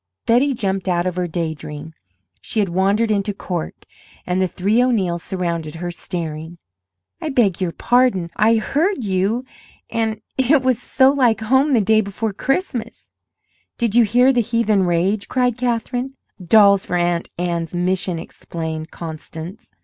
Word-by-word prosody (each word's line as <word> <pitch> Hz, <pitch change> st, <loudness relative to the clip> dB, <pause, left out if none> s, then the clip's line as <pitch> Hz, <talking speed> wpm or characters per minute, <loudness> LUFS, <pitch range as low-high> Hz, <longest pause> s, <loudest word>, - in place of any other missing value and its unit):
Betty 255 Hz, +4 st, +3 dB
jumped 195 Hz, -3 st, -2 dB
out 175 Hz, -1 st, +1 dB
of 180 Hz, -1 st, -2 dB
her 180 Hz, -1 st, -1 dB
day 165 Hz, -1 st, -2 dB
dream. 150 Hz, +1 st, -9 dB, 0.5 s
She 220 Hz, -, -3 dB
had 200 Hz, -3 st, +1 dB
wandered 200 Hz, +5 st, +1 dB
into 205 Hz, 0 st, 0 dB
"Cork" 175 Hz, -4 st, -5 dB, 0.4 s
and 180 Hz, +1 st, 0 dB
the 185 Hz, -, +2 dB
three 200 Hz, +7 st, +1 dB
O'Neills 195 Hz, -9 st, +1 dB
surrounded 170 Hz, -4 st, -3 dB
her, 175 Hz, +1 st, -4 dB
staring. 165 Hz, -1 st, -5 dB, 0.6 s
"I 315 Hz, -, -2 dB
beg 210 Hz, -, +2 dB
your 180 Hz, -2 st, 0 dB
pardon 235 Hz, -7 st, +2 dB
I 220 Hz, +3 st, +4 dB
heard 295 Hz, -, 0 dB
you 200 Hz, +5 st, 0 dB, 0.5 s
and 220 Hz, -1 st, -1 dB, 0.2 s
it 265 Hz, +1 st, +4 dB
was 255 Hz, -3 st, +1 dB
so 265 Hz, -1 st, +4 dB
like 245 Hz, -6 st, +2 dB
home 265 Hz, +6 st, +3 dB
the 235 Hz, -, +4 dB
day 220 Hz, +2 st, +4 dB
before 200 Hz, +1 st, -3 dB
Christmas 245 Hz, -, -3 dB, 0.3 s
" -, -, -44 dB
"Did 235 Hz, -4 st, 0 dB
you 240 Hz, 0 st, +6 dB
hear 245 Hz, +5 st, +4 dB
the 245 Hz, -, +3 dB
heathen 220 Hz, -4 st, +1 dB
rage?" 185 Hz, +4 st, 0 dB
cried 250 Hz, -2 st, +1 dB
Katherine. 245 Hz, +2 st, -2 dB, 0.3 s
"Dolls 200 Hz, +1 st, +5 dB
for -, -, -3 dB
Aunt 175 Hz, -1 st, 0 dB
Anne's 170 Hz, -1 st, -2 dB
mission," 180 Hz, 0 st, 0 dB
explained 160 Hz, -1 st, -6 dB
Constance. 165 Hz, +5 st, -8 dB
200 Hz, 155 wpm, -20 LUFS, 175-240 Hz, 0.6 s, you